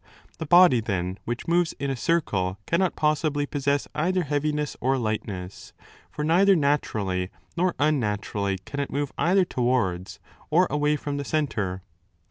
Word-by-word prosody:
The 160 - -4
body, 175 -6 +7
then, 95 -3 -3
which 120 +1 -4
moves 170 0 +2
in 140 -1 -3
a - - -1
circle 105 - 0
cannot 175 +2 +1
possibly 150 -1 +1
possess 140 0 -1
either 180 +4 0
heaviness 150 0 -1
or 135 +2 +2
lightness. 105 -5 -4 0.4
For 150 - -5
neither 190 +5 +5
naturally 105 - 0 0.3
nor 175 +1 +1
unnaturally 105 -8 0
can 145 - -6
it 140 - -2
move 145 0 -3
either 185 +2 +3
towards 120 - -1 0.3
or 175 +4 +4
away 150 0 +2
from 145 -1 -4
the 145 - -3
centre. 105 - -2
145 Hz, 145 wpm, -25 LUFS, 105-155 Hz, 0.4 s, body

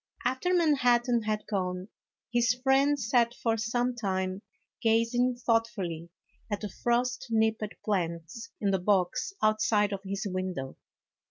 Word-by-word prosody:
After 260 +8 0
Manhattan 250 -8 +3
had 215 -1 -1
gone, 185 -2 -3 0.4
his 240 0 +3
friend 275 +2 +3
sat 235 0 +2
for 225 -1 0
some 240 +3 0
time 190 -4 -2 0.4
gazing 230 +2 +2
thoughtfully 225 -9 -1 0.4
at 205 -1 -2
the 210 - -4
frost 245 +5 -1
nipped 220 0 +2 0.2
plants 170 +1 -2
in 200 -2 +1
the 190 - +1
box 185 - +1
outside 215 -1 +3
of 195 - -4
his 195 +1 -4
window. 185 -8 -4
220 Hz, 125 wpm, -29 LUFS, 195-240 Hz, 0.4 s, Manhattan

